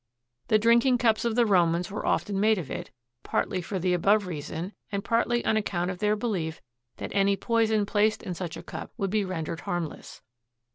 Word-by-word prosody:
The 215 - +5
drinking 235 +3 +4
cups 230 -2 +2
of 230 -2 0
the 240 -1 +4
Romans 175 -3 +2
were 210 - -4
often 200 -2 0
made 215 +1 +4
of 170 -7 -5
it, - - -5 0.3
partly 185 - -1
for 190 +3 -4
the 180 0 +1
above 200 +4 +3
reason 170 +3 -5 0.2
and 200 -1 -2
partly 235 +1 +1
on 220 - +3
account 180 -4 -1
of 180 - -7
their 210 +1 +2
belief 190 -8 -2 0.4
that - - -6
any 200 0 +3
poison 220 -1 +1
placed 210 +1 +1
in 180 - -4
such 175 -1 -5
a - - -9
cup - - -7
would 195 -4 -1
be 215 -1 +2
rendered 165 -3 -4
harmless. 175 -4 -5
200 Hz, 195 wpm, -27 LUFS, 180-220 Hz, 0.4 s, The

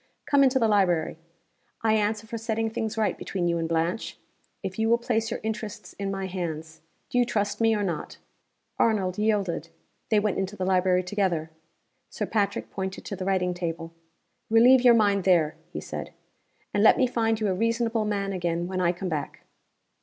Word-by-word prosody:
Come 280 -1 +4
into 265 0 +4
the 230 -3 +3
library! 175 -6 +2 0.6
I 220 -1 +3
answer 215 0 0
for 230 +1 -5
setting 225 0 -1
things 225 0 -3
right 215 -1 +1
between 180 -3 -3
you 170 0 +1
and 165 0 -2
Blanche, 165 +5 -1 0.5
if 195 +1 -5
you 220 0 +2
will 235 - +5
place 225 -2 -1
your 235 - -3
interests 220 -2 -5
in 200 -1 -2
my 195 0 -3
hands. 160 -4 -5 0.3
Do 245 - +2
you - - +6
trust 205 -2 -1
me 225 -1 +4
or 205 - -1
not?" 175 -5 -4 0.6
Arnold 200 -4 +1
yielded. 200 -7 0 0.4
They 215 -2 +4
went 205 -2 0
into 195 +1 -3
the 185 - -3
library 185 -1 +3
together. 180 -4 -1 0.6
Sir - - -3
Patrick 205 -3 -1
pointed 190 -1 -5
to 200 - -4
the 185 0 -5
writing 185 -2 +1
table. 165 -1 -4 0.6
"Relieve 240 +3 +6
your 245 -1 +7
mind 200 -3 +3
there," 170 -4 +3 0.2
he - - -4
said. - - -6 0.6
"And 205 - +2
let 220 - +7
me 260 - +4
find 225 -3 0
you 215 - 0
a - - +1
reasonable 230 +2 0
man 200 -2 -1
again 175 -2 -1
when 185 0 -2
I 175 -1 +2
come 185 +2 -5
back." 155 -3 -4
200 Hz, 190 wpm, -26 LUFS, 180-225 Hz, 0.6 s, your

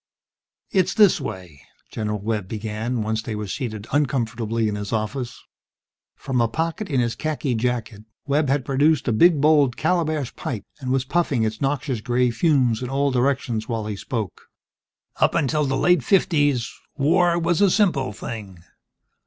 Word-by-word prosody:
"It's 190 -2 +1
this 205 -7 +5
way," 90 - -7 0.3
General 105 -1 -2
Webb 105 -2 -2
began, 110 +3 -3
once 110 +1 -1
they 110 -1 -5
were 105 0 -4
seated 110 0 -5
uncomfortably 115 -5 0
in 105 - -1
his 105 -1 -5
office. 115 +3 -3 0.8
From 125 -2 -1
a 115 - +3
pocket 165 - -3
in 135 -4 +1
his 120 -1 +1
khaki 150 -2 -2
jacket, 115 -2 -2 0.2
Webb 145 0 +1
had 135 -2 +1
produced 145 +2 +2
a - - +3
big 165 +6 +5
bowled 145 -4 +4
calabash 155 -5 0
pipe, 115 -6 -5
and 130 -3 -5
was 130 0 +1
puffing 145 -5 +1
its 110 0 -2
noxious 135 -4 -1
gray 125 +1 +1
fumes 125 -4 +2
in 125 - -4
all 140 +1 +1
directions 125 -3 0
while 115 -2 -2
he 105 -1 -3
spoke. 110 - -5 0.7
"Up - - +2
until 150 +1 +1
the 135 -1 0
late 175 -3 +3
fifties, 145 -8 +2 0.2
war 170 +4 +3
was 170 +2 +1
a 200 - +6
simple 170 - +2
thing 100 -5 -8
130 Hz, 160 wpm, -23 LUFS, 110-150 Hz, 0.8 s, a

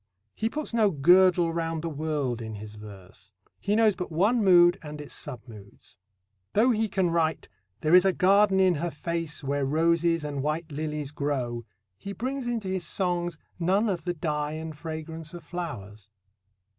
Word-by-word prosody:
He 220 - -1
puts 300 0 -5
no 220 -3 +4
girdle 175 +2 +4
round 165 -1 -2
the - - -2
world 145 -6 -2
in 110 -1 -6
his 105 +1 -9
verse. 100 -2 -13 0.3
He 205 +1 0
knows 220 -2 +4
but 180 -2 -5
one 210 +8 +2
mood 175 -2 +6
and 150 -1 -8
its 145 - -7
sub 130 -6 -6
moods. 100 -3 -14 0.6
Though 235 +5 +4
he 220 -1 0
can 185 -3 +1
write 160 -2 0 0.3
There 155 +2 +1
is 180 0 +8
a 195 - +4
garden 195 +1 +4
in 185 -1 +5
her 175 - -1
face, 165 -1 -4
Where 140 +1 -1
roses 165 +3 +2
and 145 -2 -3
white 155 +3 -2
lilies 150 -1 -4
grow, 130 -6 -2 0.3
he 200 - -6
brings 255 +5 -3
into 230 -5 -2
his 185 -1 -2
songs 175 -3 -1 0.2
none 195 +6 +2
of 180 -4 -2
the 175 -1 -1
dye 150 -1 -2
and 160 0 -6
fragrance 160 +1 -7
of 175 - -9
flowers. 105 - -7
165 Hz, 175 wpm, -27 LUFS, 145-185 Hz, 0.6 s, is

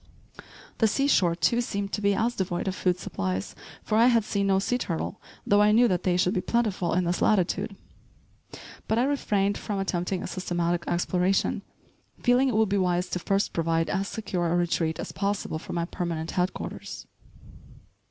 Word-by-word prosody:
The 225 - +5
sea 275 +6 +1
shore, 180 -11 +3
too, 205 +8 +2
seemed 200 -4 -3
to 210 - -1
be 200 -1 +2
as 230 +3 +1
devoid 180 -1 -2
of 190 - 0
food 180 -2 0
supplies, 95 - -3 0.3
for 215 0 +1
I 235 - +6
had 235 -3 +4
seen 200 -1 -1
no 195 -1 +3
sea 245 +6 0
turtle, 175 0 -3 0.2
though 205 0 +4
I 210 0 +5
knew 240 +3 +5
that 180 -4 0
they 180 -1 +1
should 180 +1 +2
be 185 - 0
plentiful 210 -8 0
in 180 - +2
this 175 +1 -1
latitude. 200 +1 +1 1.1
But 220 - +1
I 240 - +3
refrained 205 -8 0
from 205 - -3
attempting 185 -1 -2
a - - -4
systematic 175 -2 -1
exploration, 180 +2 +1 0.6
feeling 250 +2 +4
it 240 - -1
would 220 0 +3
be 200 0 +1
wise 180 0 0
to 180 - -1
first 195 +3 0
provide 165 0 0
as 195 +1 -1
secure 185 -6 -2
a - - +2
retreat 170 -2 0
as - - -5
possible 200 -5 -2
for - - -8
my 170 -1 -1
permanent 170 -2 -4
headquarters. 180 +1 -3
190 Hz, 185 wpm, -26 LUFS, 175-210 Hz, 1.1 s, I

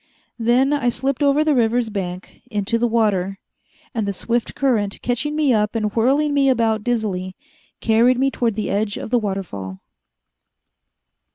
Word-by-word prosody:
Then 245 +5 +3
I 270 -4 +1
slipped 265 +3 -2
over 285 +1 +3
the 310 -1 +2
river's 235 -2 +1
bank, 185 -2 -6
into 210 +1 -1
the 240 - +2
water, 200 -4 +1 0.6
and 220 -3 -2
the 200 - -1
swift 235 +4 -2
current, 220 -7 0
catching 275 +5 -1
me 300 -4 +3
up 210 0 +1
and 210 -2 -1
whirling 280 +6 +2
me 275 -1 +3
around 225 -4 +1
dizzily, 200 -6 -2 0.5
carried 235 +3 +4
me 270 +1 +2
toward 230 -5 -1
the 215 - -2
edge 205 +1 -1
of - - -7
the 245 - +3
waterfall. 175 - -5
230 Hz, 160 wpm, -21 LUFS, 205-255 Hz, 0.6 s, carried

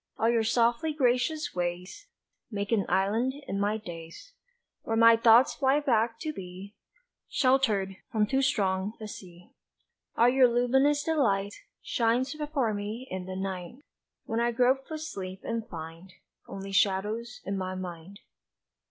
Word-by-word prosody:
All 225 - +2
your 230 -1 +2
softly 235 +6 +1
gracious 265 +3 +1
ways 180 - -4 0.4
Make 200 -1 -4
an 210 -5 +1
island 210 +8 +1
in 195 - -2
my 205 +2 +1
days 170 - -10 0.5
Where 225 - -2
my 230 0 +7
thoughts 230 +2 +5
fly 275 +1 +2
back 230 -5 +1
to 310 -1 -3
be 190 -1 -9 0.6
Sheltered 220 -8 +2
from 215 -2 +2
too 265 +5 +1
strong 195 -5 0
a 215 - -6
sea. 180 -4 -12 0.7
All 235 - +5
your 255 0 +5
luminous 265 +5 +2
delight 205 -11 +1 0.3
Shines 245 +4 +1
before 295 -7 -1
me 210 +5 -5
in 185 -1 -5
the 185 - -5
night 190 +1 -5 0.5
When 225 - -2
I 235 0 +2
grope 255 +3 +2
for 315 - -5
sleep 190 -12 -6
and 230 -1 -3
find 165 +2 -9 0.4
Only 195 0 -7
shadows 210 +5 0
in 195 - -2
my 185 -1 -3
mind. 185 +1 -8
225 Hz, 145 wpm, -28 LUFS, 190-255 Hz, 0.7 s, my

